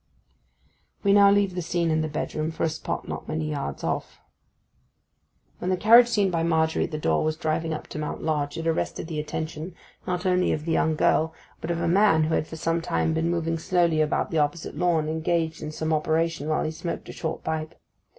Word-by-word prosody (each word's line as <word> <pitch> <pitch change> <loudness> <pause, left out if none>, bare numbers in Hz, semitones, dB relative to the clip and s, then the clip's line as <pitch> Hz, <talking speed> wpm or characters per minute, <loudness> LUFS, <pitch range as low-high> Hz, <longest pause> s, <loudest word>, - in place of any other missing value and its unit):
We 200 -1 +4
now 200 0 +7
leave 200 -2 +3
the 180 - -3
scene 170 0 0
in 155 0 +2
the 155 - -1
bedroom 155 +1 -3
for 160 - -4
a 165 - +3
spot 160 - -4
not - - -6
many 155 -1 -2
yards 140 - -4
off. - - -3 1.4
When 180 - -2
the 185 - +1
carriage 235 +5 +7
seen 205 -5 +1
by 165 -1 0
Margery 160 -1 +1
at - - -7
the 155 - -3
door 80 - +1
was 155 0 -1
driving 160 0 -1
up 155 - -4
to 155 - -6
Mount 150 - -4
Lodge 150 -1 -1
it 165 - -4
arrested 165 0 -1
the 160 -2 -4
attention, 155 +3 -5 0.3
not 180 0 -2
only 180 -1 +2
of 155 0 -4
the 165 - -1
young 160 -1 +2
girl, 160 +1 +2 0.2
but 160 - -6
of 170 -1 -1
a 170 - 0
man 180 -3 +4
who 160 +1 0
had 155 - 0
for - - -8
some 165 +1 0
time 165 -1 0
been 160 +1 0
moving 165 -1 -1
slowly 170 -2 +2
about 155 0 0
the 160 - +1
opposite 150 +3 -1
lawn, 170 -3 +1
engaged 160 0 -1
in 155 -1 -5
some 160 +1 -2
operation 160 0 0
while 155 - +1
he 155 - -2
smoked 170 +2 -5
a - - -7
short 160 - -4
pipe. 160 0 -3
160 Hz, 220 wpm, -25 LUFS, 155-170 Hz, 1.4 s, now